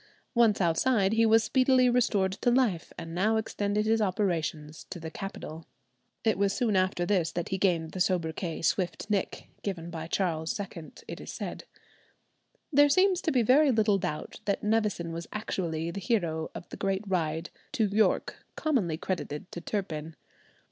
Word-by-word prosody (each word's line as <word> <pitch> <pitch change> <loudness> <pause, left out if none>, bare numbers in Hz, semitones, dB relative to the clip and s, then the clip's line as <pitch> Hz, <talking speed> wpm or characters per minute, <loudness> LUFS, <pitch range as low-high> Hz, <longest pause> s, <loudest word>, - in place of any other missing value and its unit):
Once 230 -4 +4
outside, 195 +4 +2
he 225 0 +4
was 225 0 +5
speedily 255 +1 +4
restored 225 -6 +2
to 210 +5 0
life, 240 -9 +1
and 165 0 -7
now 210 +6 +2
extended 210 -1 -1
his 225 0 +2
operations 165 -6 -1
to 180 - -6
the 160 -1 -7
capital. 165 -5 -7 0.6
It 220 -3 +2
was 200 -1 +2
soon 230 -5 +1
after 185 -1 +1
this 180 -4 +1
that 175 -1 -3
he 190 - -2
gained 165 -5 +1
the 185 - -6
soubriquet, 170 -2 -1
"Swift 190 +3 -1
Nick," 200 -3 -2
given 175 -4 -4
by 160 -1 -5
Charles 165 -1 -1
II, 175 -5 -7
it - - -7
is - - -7
said. - - -6 1.1
There 290 +1 +6
seems 370 +3 +4
to 325 - 0
be 250 -3 +3
very 275 +6 +5
little 215 -4 +3
doubt 165 -5 -4
that 200 - -1
Nevison 210 -6 0
was 165 0 -6
actually 170 -6 -2
the 200 - -5
hero 170 -7 0
of - - -7
the - - -8
great 195 0 -1
ride 165 -3 -1 0.2
to 230 -6 +2
York, 210 +2 +1
commonly 225 - 0
credited 175 -3 -4
to 170 - -6
Turpin. 165 -7 -4
195 Hz, 170 wpm, -29 LUFS, 165-220 Hz, 1.1 s, There